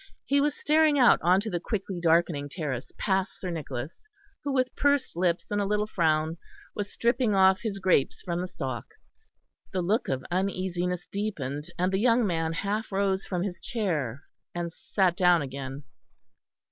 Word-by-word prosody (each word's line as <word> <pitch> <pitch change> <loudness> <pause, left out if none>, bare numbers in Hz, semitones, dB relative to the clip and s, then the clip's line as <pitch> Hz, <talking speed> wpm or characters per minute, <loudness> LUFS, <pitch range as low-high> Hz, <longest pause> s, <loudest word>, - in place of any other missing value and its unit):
He 280 +1 +3
was 295 0 +1
staring 305 0 +3
out 250 -3 +6
on 180 +3 +4
to 220 - -4
the 175 - -1
quickly 195 -1 -3
darkening 165 -3 +2
terrace, 140 -6 -4
past 190 -2 0
Sir 185 - -4
Nicholas, 150 - -6 0.4
who 285 - -1
with 255 -1 0
pursed 285 -7 +1
lips 175 +1 0
and 205 0 +1
a - - 0
little 210 +1 +1
frown 160 -4 +1 0.3
was 205 -1 -4
stripping 235 -2 +1
off 190 0 +5
his 215 -4 -3
grapes 185 -8 +2
from 175 -1 -2
the 180 - -3
stalk. 130 -8 -6 0.8
The 185 -1 0
look 210 +8 +1
of 130 -1 -2
uneasiness 180 -1 -1
deepened, 150 -8 -4
and 180 +1 +1
the 190 - +2
young 235 +1 +4
man 165 -4 0
half 205 +6 -2
rose 195 -1 0
from 180 -2 -1
his 190 -3 -5
chair, 155 - -2 0.3
and 170 -1 -3
sat 185 -4 +1
down 180 -4 +4
again. 135 +1 -6
185 Hz, 170 wpm, -27 LUFS, 165-210 Hz, 0.8 s, out